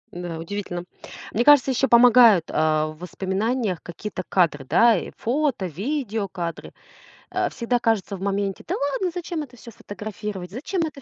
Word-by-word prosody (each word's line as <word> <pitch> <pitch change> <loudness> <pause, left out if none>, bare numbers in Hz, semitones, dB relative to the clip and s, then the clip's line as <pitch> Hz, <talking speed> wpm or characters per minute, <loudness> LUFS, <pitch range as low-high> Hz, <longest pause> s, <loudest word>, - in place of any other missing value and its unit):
Да, 175 -2 -5
удивительно. 175 +1 -5 0.5
Мне 235 - +2
кажется, 280 -1 +6
еще 265 +2 +1
помогают, 235 -7 +7
а, 155 0 +1
в 155 0 -12
воспоминаниях 190 +3 -2
какие-то 185 +3 -6
кадры, 160 -7 +2
да, 230 - +4
э, 180 - -4
фото, 260 -4 0
видеокадры. 200 - -4 0.6
А, - - 0
всегда 240 +1 -1
кажется 225 -4 0
в 190 - -10
моменте: 200 0 -2
"Да - - -1
ладно, 285 +6 -1
зачем 340 -1 -4
это 255 -4 -10
всё 235 - -12
фотографировать? 205 -3 -7
Зачем 310 - -3
это 300 -3 -8
210 Hz, 155 wpm, -23 LUFS, 180-250 Hz, 0.6 s, помогают